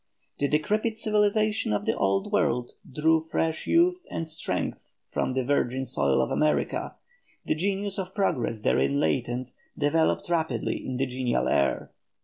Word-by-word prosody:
The 140 - +2
decrepit 210 +10 0
civilization 215 - +1
of 105 - -1
the - - +1
Old 95 0 0
World 120 0 +1 0.2
drew 160 +3 +3
fresh 160 0 -2
youth 355 +2 +3
and 165 - -4
strength 160 +1 -3 0.3
from 130 - -1
the 130 - +1
virgin 130 -1 0
soil 70 - +1
of - - -3
America, 150 0 0 0.5
the - - +1
genius 195 +4 -1
of 185 0 -5
progress 130 - 0
therein 140 +5 +2
latent 125 -2 -1 0.2
developed 155 +2 +1
rapidly 160 -8 -1
in 130 - -4
the 135 - +1
genial 125 -1 -1
air. 70 - +1
150 Hz, 145 wpm, -27 LUFS, 125-195 Hz, 0.5 s, drew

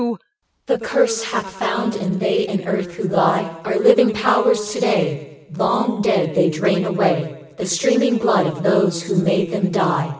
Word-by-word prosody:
The - - 0
curse 470 -2 0
hath 330 - -3
found, 225 -1 -1
and 190 -2 -3
they 205 0 0
in 195 -3 -4
earth 190 -3 -3
who - - -6
lie 185 - +2 0.2
Are - - -2
living 420 - +5
powers 210 0 +1
to - - -4
day. 155 -9 -2
Long 230 +2 0
dead, 195 -7 0
they 175 +1 +3
drain 185 +4 0
away 170 -7 -1
The 185 - -5
streaming 240 +8 +2
blood 225 -4 +2
of 160 -1 -5
those 195 -3 +2
who 185 - -3
made 180 0 +1
them 195 -2 -1
die. 175 -4 0
195 Hz, 170 wpm, -19 LUFS, 175-220 Hz, 0.2 s, living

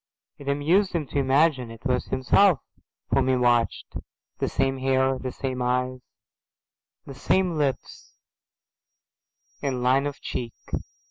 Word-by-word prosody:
It 140 - -11
amused 165 +8 +2
him 165 -4 -1
to 145 - -1
imagine 135 -2 +2
it 115 +2 -12
was 125 -2 0
himself 145 +6 +3 0.5
whom - - +2
he 130 - +3
watched, 120 -2 +1 0.4
the - - 0
same 135 0 0
hair, 130 0 +1
the 130 - -4
same 130 -1 -4
eyes, 125 +1 0 1.1
the 140 - -8
same 180 +6 +1
lips 140 -4 -3 1.4
and 130 -3 -2
line 135 +3 +3
of 145 - -6
cheek. 120 -2 -5
135 Hz, 130 wpm, -25 LUFS, 125-145 Hz, 1.4 s, himself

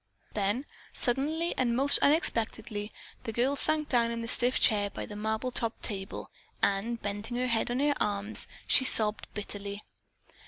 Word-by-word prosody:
Then 210 +6 -1 0.3
suddenly 300 +7 -1
and 240 -2 +1
most 275 +3 +3
unexpectedly, 220 -7 0 0.3
the 225 - -4
girl 250 +5 +1
sank 305 +1 +4
down 235 -2 +2
in 230 0 -4
the - - -5
stiff 245 +2 +3
chair 205 -3 +3
by - - -6
the 205 - -9
marble 220 +4 -2
topped 230 -2 -3
table 195 -2 -5 0.3
and 220 +4 0
bending 205 +4 -5
her 250 - 0
head 230 -2 +1
on 245 +1 -1
her 290 0 +2
arms, 205 +1 +1 0.2
she - - +4
sobbed 215 -4 +3
bitterly. 205 -1 -5
230 Hz, 160 wpm, -29 LUFS, 210-255 Hz, 0.3 s, sank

